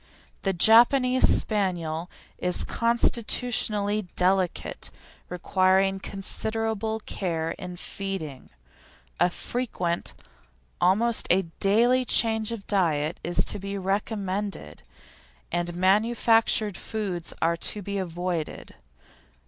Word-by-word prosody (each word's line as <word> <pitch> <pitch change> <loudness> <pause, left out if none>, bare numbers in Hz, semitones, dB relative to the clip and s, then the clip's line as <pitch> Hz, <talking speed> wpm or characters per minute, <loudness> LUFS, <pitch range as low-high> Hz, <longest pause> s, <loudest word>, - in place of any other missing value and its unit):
The 195 - 0
Japanese 240 +7 +5
Spaniel 175 -5 -1 0.3
is 180 0 0
constitutionally 220 -3 0
delicate, 185 0 0 0.4
requiring 190 +2 +1
considerable 220 +3 0
care 165 -4 -3
in 180 -1 -8
feeding. 180 -7 -7 0.7
A 175 +2 +4
frequent 180 -5 -3 0.7
almost 220 +6 +2
a 190 +2 +3 0.2
daily 240 +6 +3
change 220 -2 +3
of 225 -4 -6
diet 165 -5 0
is 175 +1 +1
to - - -2
be 200 +1 -5
recommended, 200 0 -3 0.7
and 175 0 -2
manufactured 215 +1 +2
foods 195 -6 -5
are 165 +1 +1
to 205 +4 -1
be 200 +1 -4
avoided. 175 -2 -4
195 Hz, 90 wpm, -25 LUFS, 180-220 Hz, 0.7 s, Japanese